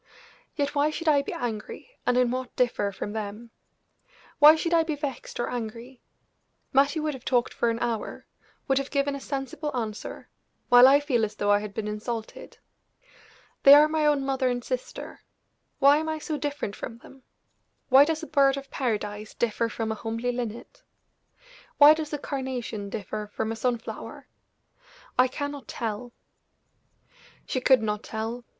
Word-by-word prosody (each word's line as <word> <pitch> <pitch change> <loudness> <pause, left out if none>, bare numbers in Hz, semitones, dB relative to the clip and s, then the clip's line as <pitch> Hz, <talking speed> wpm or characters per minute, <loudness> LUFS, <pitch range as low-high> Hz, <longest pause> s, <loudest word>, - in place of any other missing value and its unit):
"Yet, 285 -1 -1
why 290 +1 +2
should 325 +2 -5
I 290 -2 +5
be 280 - -6
angry, 230 - -5 0.2
and 245 - +3
in 250 -1 +3
what 255 0 -4
differ 235 -5 +1
from 205 +1 -6
them? 220 +2 -6 0.9
Why 300 +1 +9
should 335 +1 -2
I 335 - +5
be 320 -2 -2
vexed 280 -5 -6
or 240 - 0
angry? 240 +2 -6 0.7
Mattie 280 +4 +3
would 305 -1 -1
have 260 -2 -10
talked 245 -2 +1
for 235 - +1
an 230 - -1
hour 230 -2 -3 0.4
would 270 0 +3
have 275 - -4
given 280 -1 0
a - - -5
sensible 275 +2 -4
answer, 215 -3 -5 0.4
while 245 +1 +9
I 280 +2 +6
feel 255 -6 +1
as 215 0 -2
though 205 -1 +1
I 205 - +5
had 210 -1 -7
been 220 -2 -3
insulted. 220 +2 -6 1.0
They 280 +1 +10
are 300 +1 +7
my 310 -1 +1
own 285 -2 +2
mother 265 -1 +1
and 245 -1 -2
sister - - -6 0.6
why 280 +1 +6
am 315 +1 -2
I 315 - -2
so 310 0 -4
different 290 -8 -3
from 230 - -7
them? 265 +3 -16 0.7
Why 265 +2 +8
does 320 +2 -2
a - - -3
bird 275 -3 +3
of 275 0 -8
paradise 210 -4 -3
differ 230 0 0
from 225 0 -3
a - - -2
homely 230 +2 -2
linnet? 240 -2 -6 1.0
Why 295 +1 +9
does 310 -1 -5
a 295 - -2
carnation 255 -7 -4
differ 210 +1 -5
from 220 0 -1
a - - -3
sun 240 +2 0
flower? 225 - -9 0.9
I 255 - +6
cannot 285 +1 -5
tell." 230 +1 -4 1.3
She 255 - -2
could 255 -2 +4
not 210 -1 -1
tell. 230 +2 -5
250 Hz, 170 wpm, -26 LUFS, 225-285 Hz, 1.3 s, They